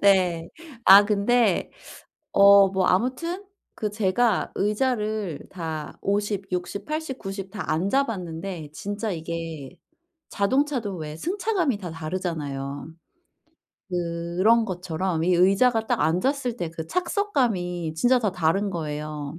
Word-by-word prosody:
네. 180 -4 +3 0.4
아 200 +2 +9
근데 210 0 +2 0.6
어 200 0 +8
뭐 190 -1 +1
아무튼 260 - 0 0.3
그 210 -1 -3
제가 215 +1 +1
의자를 210 - -1
다 160 -4 -5
50, 200 -1 -1
60, 180 +3 -3
80, 305 -3 -4
90 195 -1 -6
다 200 -3 -4
앉아봤는데 180 - -2
진짜 205 +3 -4
이게 165 -2 -6 0.5
자동차도 245 -1 0
왜 155 -1 -6
승차감이 360 - 0
다 180 -5 -7
다르잖아요. 155 -5 -4 1.0
그런 175 +6 +1
것처럼 180 -3 -2
이 180 0 +3
의자가 220 +6 +3
딱 - - 0
앉았을 240 - 0
때 170 -2 -4
그 160 -1 -5
착석감이 235 - -1
진짜 245 +10 +3
다 210 -5 -1
다른 185 +4 +1
거예요. 150 -2 -5
195 Hz, 210 characters per minute, -25 LUFS, 170-225 Hz, 1.0 s, 아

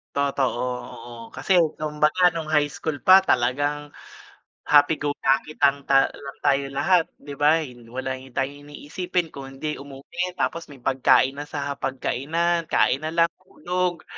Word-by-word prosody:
Totoo, 140 -3 0 0.4
oo, 120 +1 -11 0.2
kasi - - -4 0.2
kumbaga 155 +4 +2
nung 160 -2 -5
high 145 -2 +2
school 155 -3 -5
pa 190 0 +8
talagang 145 -1 0 0.8
happy 145 +1 +5
go 145 0 -2
lucky 135 +3 +1
lang 140 0 +3
ta 135 0 +4
lang 140 -1 -10
tayo 140 -1 +2
lahat, 165 +5 +2 0.2
'di 145 - -8
ba. 155 +2 +4
Hin 120 -4 -12
wala 130 +2 -4
hi 135 - -13
tayong 145 +2 -3
iniisipin 170 +3 -3
kung 135 -1 -9
hindi 145 +3 -5
umuwi 145 +6 -6
tapos 165 -1 -2
may 135 -4 -15
pagkain 135 +1 +3
na 145 - -6
sa 145 -1 -4
hapagkainan, 155 +5 -1
kain 135 - +2
na 155 +2 -5
lang 170 0 +3
tulog, 180 -2 -3
145 Hz, 155 wpm, -24 LUFS, 135-160 Hz, 0.8 s, pa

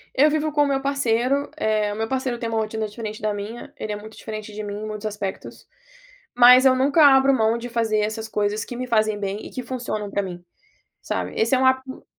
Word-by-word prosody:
Eu 295 +3 +5
vivo 310 0 0
com 295 - +1
o - - +1
meu 270 -1 +1
parceiro, 275 0 0
eh, 215 -3 0
o - - -4
meu 225 +1 -2
parceiro 260 -2 -2
tem 230 - -4
uma 225 -1 -1
rotina 220 0 -2
diferente 215 0 -7
da 215 -1 0
minha. 205 +4 -7
Ele 215 - -5
é - - -3
muito 215 +1 -10
diferente 215 -1 -7
de 215 0 -6
mim 205 0 -5
em - - -4
muitos 215 0 -5
aspectos, 205 -2 -6 0.7
mas 250 +2 +8
eu 260 - +6
nunca 280 +4 +4
abro 270 0 +6
mão 225 -2 +2
de 240 +1 -6
fazer 225 -2 0
essas 220 +1 -2
coisas 210 0 -1
que 245 - -7
me 255 +1 -4
fazem 215 -2 +1
bem 200 +1 -4
e - - -8
que 255 - -5
funcionam 235 -5 -4
para 200 - 0
mim, 175 -2 -7 0.6
sabe, - - -3
esse 230 +4 +3
é - - +1
um 260 - +2
hábito 260 0 0
225 Hz, 235 wpm, -23 LUFS, 215-260 Hz, 0.7 s, mas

